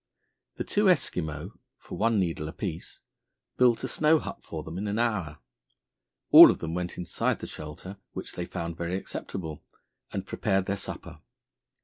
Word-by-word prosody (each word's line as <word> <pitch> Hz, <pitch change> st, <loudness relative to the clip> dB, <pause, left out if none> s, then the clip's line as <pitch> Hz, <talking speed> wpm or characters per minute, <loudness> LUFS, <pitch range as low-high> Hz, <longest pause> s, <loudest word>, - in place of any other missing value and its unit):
The -, -, -3 dB
two 210 Hz, +1 st, +1 dB
Eskimo, 90 Hz, -, 0 dB, 0.2 s
for -, -, -9 dB
one 115 Hz, 0 st, +2 dB
needle 85 Hz, -4 st, -1 dB
apiece, 85 Hz, +1 st, -6 dB, 0.6 s
built 120 Hz, -2 st, +4 dB
a -, -, -1 dB
snow 155 Hz, +1 st, +4 dB
hut -, -, -6 dB
for 80 Hz, -2 st, -6 dB
them 80 Hz, +4 st, -6 dB
in 105 Hz, -, -3 dB
an 100 Hz, +1 st, -1 dB
hour. 100 Hz, -10 st, 0 dB, 0.9 s
All -, -, +12 dB
of -, -, +1 dB
them 80 Hz, 0 st, -4 dB
went 90 Hz, 0 st, -3 dB
inside 90 Hz, -2 st, -1 dB
the -, -, -7 dB
shelter, 75 Hz, +6 st, -8 dB, 0.2 s
which -, -, -6 dB
they 90 Hz, -, -4 dB
found 85 Hz, -2 st, -5 dB
very 85 Hz, +1 st, -2 dB
acceptable, 80 Hz, -4 st, -6 dB, 0.5 s
and 95 Hz, -1 st, -4 dB
prepared 95 Hz, -1 st, 0 dB
their 100 Hz, -, -1 dB
supper. 100 Hz, -, -7 dB
90 Hz, 160 wpm, -28 LUFS, 80-105 Hz, 0.9 s, All